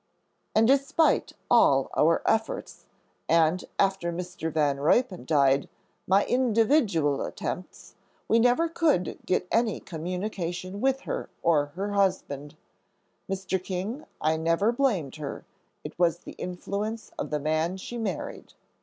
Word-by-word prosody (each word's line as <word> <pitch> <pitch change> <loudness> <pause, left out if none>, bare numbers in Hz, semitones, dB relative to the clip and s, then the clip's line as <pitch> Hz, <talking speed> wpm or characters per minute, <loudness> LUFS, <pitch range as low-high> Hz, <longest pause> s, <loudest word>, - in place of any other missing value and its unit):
"And 225 +1 +5
despite 275 +4 +3
all - - +4
our - - +3
efforts, - - -1 0.4
and, 165 +2 +3
after 190 -3 +1
Mr. 175 -2 -4
Van 145 -3 +1
Ruypen 180 - +2
died, 140 -3 +3 0.4
my 195 +2 +4
individual 225 - +2
attempts, 180 - -6 0.3
we 230 - +4
never 245 +8 +3
could 320 - +1
get 185 0 +1
any 230 -2 +1
communication 180 +2 -4
with 270 0 +1
her - - -4
or 150 -4 +3
her 200 +3 -3
husband. 185 -8 -1 0.7
Mr. 190 -1 -2
King, 195 +10 -4
I 160 +1 +1
never 165 +7 +2
blamed 210 - 0
her; 150 -3 -6 0.4
it - - -9
was 170 -2 +3
the - - -9
influence 205 +5 -5
of - - -3
the 150 - -1
man 155 +4 0
she 240 +5 -6
married." 200 -7 -5
185 Hz, 130 wpm, -27 LUFS, 160-225 Hz, 0.7 s, And